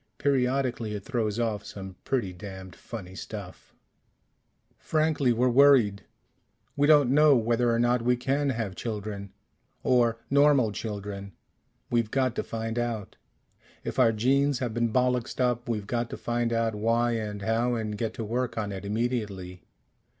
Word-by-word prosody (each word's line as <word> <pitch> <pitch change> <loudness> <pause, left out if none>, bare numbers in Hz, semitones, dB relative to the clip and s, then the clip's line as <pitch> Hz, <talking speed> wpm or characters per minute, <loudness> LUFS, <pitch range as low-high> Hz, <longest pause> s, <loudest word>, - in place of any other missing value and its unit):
Periodically 125 -5 0
it 100 -1 -7
throws 115 -4 -1
off 110 -3 -1
some 95 -2 -8
pretty 115 -9 -1
damned 95 0 -9
funny 95 -6 -8
stuff. 100 -1 -9 1.1
"Frankly, 155 -4 +1
we're 120 +2 +2
worried. 125 -6 +5 0.7
We 145 0 +3
don't 145 -5 +6
know 150 0 +6
whether 120 +1 +2
or 115 - +2
not 120 +1 +2
we 125 +1 +2
can 140 +3 0
have 110 -6 -2
children. 100 -1 -5 0.5
Or 120 -3 +3
normal 140 -5 +4
children. 100 -2 -6 0.6
We've 115 -2 +1
got 130 0 +1
to - - 0
find 115 +1 -3
out. 115 -4 -3 0.7
If - - -4
our 120 -3 +6
genes 135 +5 +2
have 120 -3 -3
been 120 0 0
bollixed 125 0 0
up, 125 0 0
we've 105 -3 -2
got 120 +2 -2
to - - -6
find 120 0 -1
out 115 -1 +1
why 115 +3 +1
and 105 -3 -3
how 115 +3 +1
and 110 -2 -3
get 110 +1 -3
to 115 - -4
work 120 +3 -2
on 105 -2 -2
it 95 0 -6
immediately. 100 -5 -3
115 Hz, 155 wpm, -27 LUFS, 105-125 Hz, 1.1 s, don't